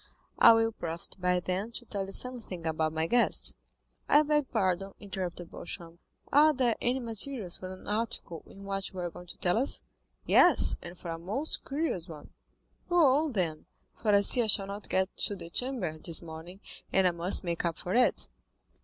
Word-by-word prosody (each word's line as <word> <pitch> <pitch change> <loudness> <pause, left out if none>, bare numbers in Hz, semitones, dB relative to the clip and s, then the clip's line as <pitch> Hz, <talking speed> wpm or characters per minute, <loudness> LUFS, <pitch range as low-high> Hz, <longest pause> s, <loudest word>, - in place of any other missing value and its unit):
"I - - +9
will 225 0 +2
profit 170 -5 -6
by 180 0 +2
them 185 +5 -2
to 240 - -6
tell 200 -3 -4
you - - -8
something 225 -8 -2
about 160 -1 0
my 160 0 -1
guest." 240 +8 +2 0.5
"I 295 - +6
beg 295 -2 +1
pardon," 190 +1 0
interrupted 185 -4 -5
Beauchamp; 170 0 -7 0.3
"are 305 +2 +6
there 245 -3 +2
any 250 +2 +1
materials 230 -4 -3
for 185 0 -7
an 185 - -11
article 210 -6 -3
in 195 - -13
what 195 -1 -3
you 190 - -13
are 175 -1 -3
going 180 - -11
to - - -9
tell 180 +4 +1
us?" 265 - -1 0.4
"Yes, - - +5
and 175 +1 -9
for 170 - -6
a 165 - -5
most 215 - -1
curious 270 - -2
one." 150 -3 -11 0.6
"Go 350 - 0 0.3
on, 295 - -4
then, 165 -6 -2 0.3
for 220 - -3
I 200 - +6
see 240 +4 +5
I 225 - +1
shall 200 -2 +4
not 200 +1 -7
get 190 0 0
to 205 - -1
the 170 -3 -9
Chamber 220 -10 -2
this 165 +1 +2
morning, 170 +4 -10 0.3
and 190 -1 +3
I 180 - +4
must 175 +4 +3
make 170 -2 -2
up 170 -3 -1
for 180 - -4
it." 250 +1 +2
190 Hz, 195 wpm, -30 LUFS, 170-230 Hz, 0.6 s, I